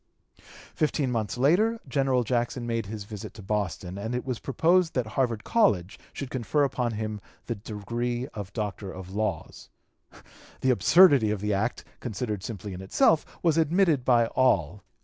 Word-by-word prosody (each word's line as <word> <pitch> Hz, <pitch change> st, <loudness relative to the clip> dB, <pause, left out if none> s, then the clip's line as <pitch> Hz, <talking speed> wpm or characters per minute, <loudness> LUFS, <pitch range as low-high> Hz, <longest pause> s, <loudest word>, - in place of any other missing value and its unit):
Fifteen 150 Hz, -4 st, 0 dB
months 115 Hz, -1 st, -2 dB
later 195 Hz, -, +3 dB
General 130 Hz, -1 st, +1 dB
Jackson 120 Hz, +1 st, -1 dB
made 115 Hz, -3 st, -2 dB
his 105 Hz, 0 st, -6 dB
visit 105 Hz, -1 st, -8 dB
to 105 Hz, -, -10 dB
Boston, 95 Hz, -2 st, -3 dB
and 110 Hz, +4 st, -3 dB
it 125 Hz, -, -3 dB
was 125 Hz, -3 st, -3 dB
proposed 165 Hz, +6 st, +2 dB
that 125 Hz, -3 st, +1 dB
Harvard 120 Hz, -5 st, 0 dB
College 105 Hz, -, +1 dB
should 135 Hz, -2 st, -6 dB
confer 130 Hz, +4 st, 0 dB
upon 125 Hz, -4 st, -1 dB
him 110 Hz, -1 st, -4 dB, 0.2 s
the 120 Hz, -, -2 dB
degree 120 Hz, +4 st, -4 dB
of 100 Hz, -2 st, -6 dB
Doctor 105 Hz, -3 st, -4 dB
of 95 Hz, 0 st, -9 dB
Laws. 105 Hz, -5 st, -3 dB, 0.9 s
The 130 Hz, -, +3 dB
absurdity 140 Hz, -, +6 dB
of 105 Hz, -1 st, -1 dB
the 105 Hz, +1 st, -1 dB
act, 105 Hz, +5 st, -1 dB
considered 105 Hz, -3 st, -4 dB
simply 100 Hz, -3 st, -6 dB
in 90 Hz, -, -7 dB
itself, 145 Hz, +11 st, +3 dB, 0.2 s
was 165 Hz, -2 st, +3 dB
admitted 165 Hz, -3 st, +3 dB
by 120 Hz, -2 st, +4 dB
all. 105 Hz, -, +1 dB
115 Hz, 160 wpm, -27 LUFS, 105-130 Hz, 0.9 s, absurdity